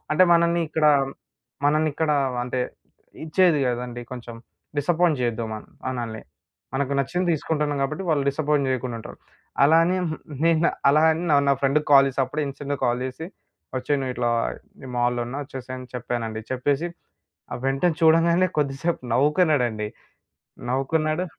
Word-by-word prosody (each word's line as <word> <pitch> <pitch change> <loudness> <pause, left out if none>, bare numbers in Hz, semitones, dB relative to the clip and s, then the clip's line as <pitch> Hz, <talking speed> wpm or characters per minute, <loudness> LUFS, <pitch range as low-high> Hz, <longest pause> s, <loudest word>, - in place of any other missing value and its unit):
అంటే 170 - +5
మనల్ని 170 0 +3
ఇక్కడ 155 0 -1 0.8
మనల్ని 155 +1 +2
ఇక్కడ 155 0 0 0.3
అంటే 125 +1 -2 0.6
ఇచ్చేది 170 0 +3
కదండీ 120 0 -3
కొంచెం 120 -2 -8 0.4
డిసప్పాయింట్ 160 0 +2
చేయొద్దు. 120 -1 -1
మన్ 110 - -7 0.2
మనల్ని. 120 -4 -4 0.5
మనకు 140 0 -1
నచ్చింది 175 +7 -1
తీసుకుంటున్నాం 150 -1 -1
గాబట్టి, 155 +7 -2
వాళ్ళు 145 -3 +2
డిసప్పాయింట్ 145 -1 +1
చేయకుండా 125 -2 -2
ఉంటారు. - - -10 0.4
అలా 155 +3 +6
అని 180 +2 +1 0.5
నేను 165 0 +4 0.2
అలా 150 +2 +5
అని 160 - -3
నా 145 - +5
నా - - +5
ఫ్రెండ్‌కి 145 +3 +2
కాల్ 135 0 +8
చేసి, 135 0 -2
అప్పుడే, 150 +4 -3
ఇన్స్టాంట్ 140 +1 -4
కాల్ 120 0 +1
చేసి, 145 +6 -7 0.5
వచ్చేయ్ 140 +3 0
నువ్వు 130 -1 -3
ఇట్లా 120 -1 0 0.5
నేను 130 -2 -9
మాల్‌లో 120 0 +1
ఉన్నా, 135 +4 -5
వచ్చేసేయ్ 130 -2 -7
అని 130 - -9
చెప్పానండి. 115 -2 -3
చెప్పేసి 140 +6 0 0.8
వెంటనే 145 +5 +1
చూడంగానే 170 +3 +4
కొద్దిసేపు 145 +3 -1
నవ్వుకున్నాడండి. 135 - +2 0.8
నవ్వుకున్నాడు. 155 +5 0
140 Hz, 140 wpm, -24 LUFS, 125-160 Hz, 0.8 s, కాల్